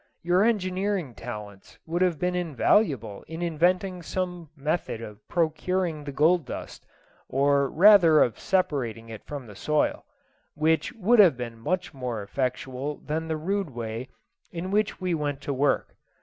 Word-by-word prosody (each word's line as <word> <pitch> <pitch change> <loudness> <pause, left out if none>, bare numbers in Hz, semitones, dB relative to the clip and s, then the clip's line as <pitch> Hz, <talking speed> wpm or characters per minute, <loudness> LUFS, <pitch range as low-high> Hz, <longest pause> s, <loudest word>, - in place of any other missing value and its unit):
Your 175 +2 +3
engineering 190 - 0
talents 105 -5 -9
would 170 +2 -2
have 180 -3 +2
been 180 +4 0
invaluable 150 - +1
in 165 +2 -5
inventing 180 +3 +1
some 180 -2 -4
method 150 -3 -2
of 105 -2 -9
procuring 170 0 -1
the 140 - -4
gold 160 +5 +3
dust, 125 - -8 0.4
or 140 0 +2
rather 175 -4 +7
of 120 - -2
separating 125 - -1
it 110 -2 -9
from 145 -3 -7
the 105 - -11
soil, 150 +9 0 0.5
which 160 +1 +1
would 230 +1 +3
have 175 -11 +7
been 120 -2 -6
much 180 +8 -2
more 125 -5 -4
effectual 130 +4 -3
than 160 +2 -4
the 160 -1 -1
rude 195 +3 -1
way 115 0 -5 0.4
in 175 +2 -5
which 210 0 +1
we 185 -2 -1
went 145 -3 -2
to 140 - -3
work. 140 +2 0
155 Hz, 150 wpm, -26 LUFS, 130-180 Hz, 0.5 s, rather